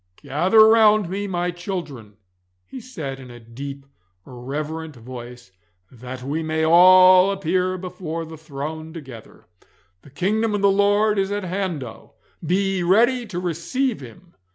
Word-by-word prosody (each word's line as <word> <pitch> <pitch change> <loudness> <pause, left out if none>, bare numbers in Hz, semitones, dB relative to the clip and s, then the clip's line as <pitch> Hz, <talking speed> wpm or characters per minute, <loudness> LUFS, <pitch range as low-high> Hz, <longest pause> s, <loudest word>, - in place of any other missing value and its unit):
'Gather 190 +10 +4
round 215 -4 +4
me, 200 +1 -3
my 175 -1 -2
children,' 170 - -7 0.5
he 260 - -9
said, 155 - -7
in 130 -1 -12
a 120 0 -12
deep 135 +4 -9 0.4
reverent 150 +5 -6
voice, 120 -2 -11 0.4
'that 125 +1 -9
we 145 +5 -3
may 160 0 -1
all 185 +2 +7
appear 185 -1 -1
before 175 -3 -6
the 160 0 -10
throne 155 +1 -7
together. 130 -9 -12 0.6
The - - -17
kingdom 210 +9 -1
of 205 - -2
the 200 -1 +4
Lord 205 +1 +2
is 195 0 -1
at 205 0 -3
hand 185 -5 -3
oh, 115 -3 -12 0.3
be 195 +3 0
ye - - -1
ready 235 +7 +2
to 180 -4 -5
receive 185 - -2
Him! 130 +8 -14
175 Hz, 150 wpm, -22 LUFS, 140-195 Hz, 0.6 s, all